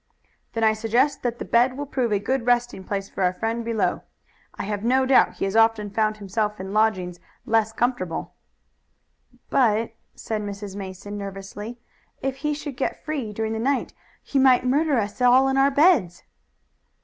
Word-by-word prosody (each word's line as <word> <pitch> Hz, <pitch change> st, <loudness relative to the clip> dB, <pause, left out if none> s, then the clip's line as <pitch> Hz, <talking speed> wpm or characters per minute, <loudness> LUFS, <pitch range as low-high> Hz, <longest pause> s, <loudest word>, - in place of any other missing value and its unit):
"Then 225 Hz, -1 st, -1 dB
I 220 Hz, 0 st, +5 dB
suggest 235 Hz, +6 st, +1 dB
that 240 Hz, -1 st, -2 dB
the -, -, -6 dB
bed 250 Hz, +2 st, +3 dB
will 290 Hz, -, -3 dB
prove 255 Hz, -4 st, -1 dB
a 205 Hz, -, +3 dB
good 235 Hz, +4 st, -2 dB
resting 240 Hz, -5 st, +1 dB
place 195 Hz, 0 st, -3 dB
for -, -, -7 dB
our 180 Hz, 0 st, +2 dB
friend 230 Hz, +3 st, -2 dB
below. 230 Hz, -2 st, 0 dB, 0.5 s
I -, -, -5 dB
have 205 Hz, 0 st, -3 dB
no 260 Hz, +3 st, +3 dB
doubt 260 Hz, 0 st, +4 dB
he -, -, -2 dB
has 195 Hz, +2 st, -3 dB
often 225 Hz, -2 st, +3 dB
found 215 Hz, 0 st, 0 dB
himself 210 Hz, +1 st, -2 dB
in 190 Hz, +1 st, -6 dB
lodgings 190 Hz, -5 st, +1 dB, 0.3 s
less 225 Hz, -2 st, +2 dB
comfortable." 220 Hz, -8 st, -2 dB, 1.2 s
"But," 225 Hz, -3 st, +2 dB, 0.2 s
said 220 Hz, -1 st, -4 dB
Mrs. 200 Hz, -1 st, -6 dB
Mason 200 Hz, +1 st, -7 dB
nervously, 200 Hz, +3 st, -7 dB, 0.4 s
"if 270 Hz, 0 st, -3 dB
he 300 Hz, +1 st, -1 dB
should 290 Hz, -3 st, -7 dB
get 265 Hz, -, -3 dB
free 285 Hz, -8 st, -3 dB
during 220 Hz, +1 st, -2 dB
the 220 Hz, -, -3 dB
night 270 Hz, +3 st, 0 dB, 0.3 s
he 275 Hz, -, 0 dB
might 260 Hz, -1 st, +5 dB
murder 285 Hz, +2 st, +2 dB
us 205 Hz, +2 st, -3 dB
all 250 Hz, +2 st, +6 dB
in 270 Hz, -, +1 dB
our 270 Hz, +1 st, +4 dB
beds." 280 Hz, -, +3 dB
225 Hz, 175 wpm, -24 LUFS, 205-255 Hz, 1.2 s, all